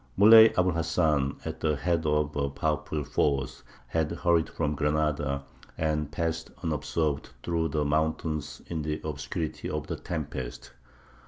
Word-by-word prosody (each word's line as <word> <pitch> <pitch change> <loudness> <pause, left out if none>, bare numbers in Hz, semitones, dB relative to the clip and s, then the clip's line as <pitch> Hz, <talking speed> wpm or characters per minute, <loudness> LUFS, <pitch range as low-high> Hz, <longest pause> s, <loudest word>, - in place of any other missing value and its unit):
Muley 110 +3 +9
Abu 90 0 +4
l 85 - -1
Hasan, 80 -4 +1
at 80 0 -5
the 75 -2 +1
head 85 +1 0
of 75 0 +1
a 70 -1 0
powerful 75 +1 -2
force, 70 -2 0 0.2
had 80 +4 0
hurried 85 -1 +2
from 75 -2 -1
Granada, 75 -2 0 0.3
and 75 -2 -1
passed 80 +1 -2
unobserved 75 -2 -1
through 85 -1 0
the 75 -2 -1
mountains 75 0 -1
in 80 -2 -3
the 75 0 -2
obscurity 75 +1 -4
of - - -3
the - - -4
tempest. 75 -7 -5
75 Hz, 145 wpm, -28 LUFS, 75-80 Hz, 0.3 s, Muley